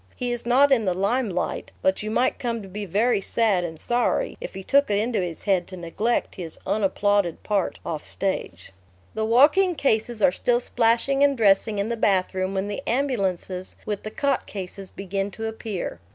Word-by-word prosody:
He 245 -1 -2
is 240 0 -3
not 275 +4 +5
in 235 -5 +4
the 185 -2 +1
limelight; 200 -1 -1
but 190 0 +2
you 215 - -4
might 245 +4 +1
come 230 -3 -2
to - - -9
be 205 +2 -6
very 210 +4 +2
sad 205 -3 +1
and 160 -2 -6
sorry 245 - 0
if - - -7
he 190 - -6
took 280 +5 +3
it 205 - +2
into 220 -1 0
his 175 -3 -5
head 190 -4 +1
to 185 - -9
neglect 195 +8 -1
his 170 -5 -7
unapplauded 200 -3 +1
part 200 -3 0
off 155 -2 -4
stage. 95 - -3 0.4
The 220 - -1
walking 300 - +5
cases 225 -5 0
are - - +6
still 240 +6 +1
splashing 245 +3 +2
and 280 -1 +3
dressing 210 0 +3
in 200 +2 -1
the 235 - -2
bathroom 190 -2 +1
when 190 +1 -1
the 205 - -4
ambulances 195 -8 -1
with 210 -2 -3
the 215 - -6
cot 280 +1 -1
cases 195 -1 -7
begin 195 +1 -3
to 225 +3 -6
appear. 220 - -5
210 Hz, 190 wpm, -24 LUFS, 190-240 Hz, 0.4 s, are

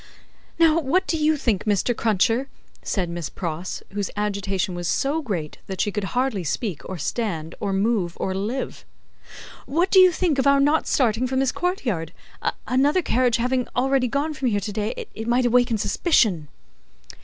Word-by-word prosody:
"Now 330 -1 +5
what 335 +6 +1
do 330 - -1
you 310 0 +2
think, 230 -9 0
Mr. 210 +3 +1
Cruncher," 225 +5 +1 0.3
said 185 -4 -1
Miss 170 -2 -4
Pross, 175 0 -5
whose 200 -1 -2
agitation 200 -2 -1
was 175 -1 -4
so 285 - 0
great 180 - -4
that 190 -2 -6
she 205 - +1
could 210 -1 -2
hardly 250 -7 0
speak, 175 - -3
or 190 - -4
stand, 165 -2 -3
or 200 - -2
move, 195 -3 0
or 190 - -1
live: 210 - -3 0.8
"what 335 +8 +1
do 380 - +7
you 370 -1 +8
think 330 -5 0
of 265 - +2
our 280 0 +5
not 295 +3 +2
starting 245 -1 +2
from 260 +1 -2
this 265 -1 +2
courtyard? 240 - -2 0.5
Another 285 +8 +2
carriage 250 -3 +2
having 250 +1 0
already 265 0 +2
gone 285 +5 -1
from 265 -3 -2
here 205 -4 +1
to 205 +1 -4
day, 210 +1 -3
it 225 +1 -6
might 245 +1 +2
awaken 245 -1 +3
suspicion." 205 - +2
235 Hz, 175 wpm, -23 LUFS, 195-275 Hz, 0.8 s, you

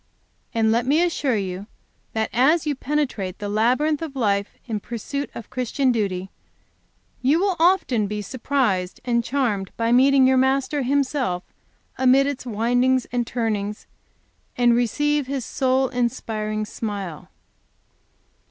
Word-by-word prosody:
And 225 -1 +2
let 235 +2 +1
me 305 +5 +4
assure 295 -7 0
you 190 0 -4 0.5
that 220 0 -1
as 290 +8 +3
you 300 - +1
penetrate 260 -10 -2
the 205 - -5
labyrinth 255 +9 +1
of 310 -4 -5
life 200 -5 0
in 220 -4 -3
pursuit 240 +6 -5
of 230 - -9
Christian 255 +1 0
duty, 195 -5 -2 0.9
you 285 +6 +3
will 385 -1 +1
often 325 - +3
be 210 0 -4
surprised 230 -6 -1
and 235 -1 +1
charmed 225 -8 -1
by 230 0 +1
meeting 265 +2 +5
your 260 0 +4
Master 265 +2 +1
Himself 260 -8 0 0.6
amid 260 +1 +5
its 280 -2 -4
windings 245 +3 +2
and 240 -1 -1
turnings, 210 -3 -2 0.7
and 240 -1 +4
receive 290 +4 +1
His 270 -3 -3
soul 260 0 +1
inspiring 220 -4 -2
smile. 200 -7 -5
245 Hz, 135 wpm, -23 LUFS, 215-275 Hz, 0.9 s, meeting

